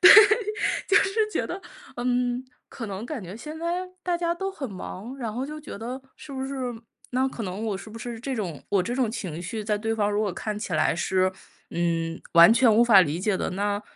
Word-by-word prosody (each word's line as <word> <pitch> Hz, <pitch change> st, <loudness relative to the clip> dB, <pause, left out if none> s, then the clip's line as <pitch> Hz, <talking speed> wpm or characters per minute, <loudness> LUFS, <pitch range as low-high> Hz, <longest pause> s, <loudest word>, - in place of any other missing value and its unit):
对， -, -, +10 dB, 0.8 s
就 400 Hz, -, +5 dB
是 385 Hz, -, -1 dB, 0.2 s
觉 -, -, 0 dB
得， 370 Hz, +3 st, -5 dB, 0.4 s
嗯， 245 Hz, 0 st, 0 dB, 0.2 s
可 230 Hz, -, -6 dB
能 200 Hz, +1 st, -5 dB
感 255 Hz, -2 st, -5 dB
觉 185 Hz, +3 st, -8 dB
现 305 Hz, +7 st, -7 dB
在 350 Hz, +2 st, -2 dB
大 350 Hz, -1 st, 0 dB
家 340 Hz, 0 st, 0 dB
都 385 Hz, +2 st, -3 dB
很 280 Hz, -, -6 dB
忙， 200 Hz, +6 st, -7 dB
然 230 Hz, -4 st, -3 dB
后 250 Hz, +4 st, -2 dB
就 305 Hz, +1 st, -7 dB
觉 300 Hz, -, -8 dB
得， 245 Hz, +4 st, -5 dB, 0.2 s
是 290 Hz, -, -10 dB
不 265 Hz, 0 st, -3 dB
是 275 Hz, -, -5 dB, 0.6 s
那 260 Hz, +2 st, +2 dB
可 240 Hz, -, -6 dB
能 195 Hz, +2 st, -4 dB
我 205 Hz, -, -1 dB
是 215 Hz, -, -10 dB
不 225 Hz, -, -8 dB
是 235 Hz, 0 st, -5 dB
这 265 Hz, +2 st, -3 dB
种 180 Hz, -, -4 dB
我 200 Hz, -2 st, +3 dB
这 235 Hz, +7 st, -2 dB
种 250 Hz, -4 st, +1 dB
情 175 Hz, -7 st, -5 dB
绪 215 Hz, +5 st, -4 dB
在 210 Hz, -1 st, +1 dB
对 225 Hz, +1 st, -1 dB
方 205 Hz, -1 st, +1 dB
如 205 Hz, -, +1 dB
果 205 Hz, -3 st, 0 dB
看 210 Hz, +3 st, -4 dB
起 205 Hz, -4 st, -5 dB
来 155 Hz, +1 st, +3 dB
是， 185 Hz, +1 st, +2 dB, 0.4 s
嗯， 165 Hz, -1 st, -1 dB
完 170 Hz, +5 st, +9 dB
全 235 Hz, -1 st, +5 dB
无 230 Hz, -, +6 dB
法 210 Hz, -5 st, +8 dB
理 155 Hz, 0 st, -1 dB
解 200 Hz, 0 st, +1 dB
的， -, -, -2 dB
那 205 Hz, +2 st, -1 dB
225 Hz, 245 characters per minute, -26 LUFS, 190-260 Hz, 0.8 s, 对